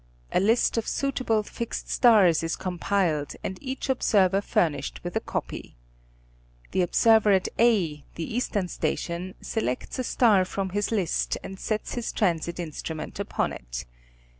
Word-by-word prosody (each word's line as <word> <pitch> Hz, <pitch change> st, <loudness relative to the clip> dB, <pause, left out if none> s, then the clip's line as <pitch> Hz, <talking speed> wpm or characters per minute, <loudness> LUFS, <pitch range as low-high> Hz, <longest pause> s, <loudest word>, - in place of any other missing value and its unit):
A -, -, +3 dB
list 225 Hz, +5 st, +2 dB
of 225 Hz, -, -5 dB
suitable 255 Hz, -6 st, 0 dB
fixed 230 Hz, +2 st, -5 dB
stars 205 Hz, -, +5 dB
is 165 Hz, 0 st, -1 dB
compiled 180 Hz, -4 st, -1 dB
and 190 Hz, -, -4 dB
each 265 Hz, -1 st, -4 dB
observer 200 Hz, -7 st, +3 dB
furnished 145 Hz, -8 st, 0 dB
with 175 Hz, 0 st, -5 dB
a -, -, +3 dB
copy. -, -, -5 dB, 1.0 s
The 190 Hz, -, +1 dB
observer 215 Hz, +3 st, +4 dB
at 190 Hz, -1 st, +2 dB
A 185 Hz, -11 st, +3 dB
the 165 Hz, +6 st, -4 dB
eastern 205 Hz, -6 st, 0 dB
station, 175 Hz, +1 st, -3 dB
selects 175 Hz, -, -3 dB
a -, -, 0 dB
star 220 Hz, -6 st, +4 dB
from 190 Hz, +1 st, -3 dB
his 205 Hz, +3 st, -1 dB
list 195 Hz, -7 st, 0 dB
and 190 Hz, 0 st, -8 dB
sets 215 Hz, -1 st, -2 dB
his 240 Hz, -2 st, -3 dB
transit 170 Hz, -3 st, 0 dB
instrument 160 Hz, -1 st, -5 dB
upon -, -, -1 dB
it. -, -, -7 dB
190 Hz, 145 wpm, -26 LUFS, 170-225 Hz, 1.0 s, stars